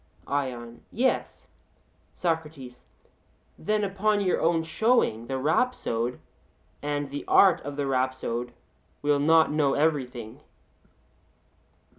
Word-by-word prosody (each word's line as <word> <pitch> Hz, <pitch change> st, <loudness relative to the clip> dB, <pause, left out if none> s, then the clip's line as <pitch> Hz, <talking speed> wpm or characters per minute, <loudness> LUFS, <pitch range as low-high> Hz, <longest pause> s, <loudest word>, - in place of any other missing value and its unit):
ION: 125 Hz, -4 st, -4 dB
Yes. 255 Hz, +3 st, -1 dB, 0.7 s
SOCRATES: 150 Hz, -7 st, -4 dB, 0.7 s
Then 210 Hz, +5 st, 0 dB
upon 205 Hz, +2 st, +1 dB
your 190 Hz, -3 st, +1 dB
own 165 Hz, 0 st, +2 dB
showing 160 Hz, -, +1 dB
the 135 Hz, -, -2 dB
rhapsode, 130 Hz, -, 0 dB, 0.6 s
and 145 Hz, -1 st, -3 dB
the 145 Hz, -, -5 dB
art 190 Hz, -3 st, +5 dB
of 145 Hz, 0 st, -6 dB
the 145 Hz, 0 st, -2 dB
rhapsode, 130 Hz, -2 st, -1 dB, 0.5 s
will 145 Hz, -1 st, +2 dB
not 160 Hz, +2 st, +4 dB
know 150 Hz, -2 st, +2 dB
everything? 130 Hz, -7 st, -1 dB
145 Hz, 100 wpm, -26 LUFS, 130-165 Hz, 0.7 s, art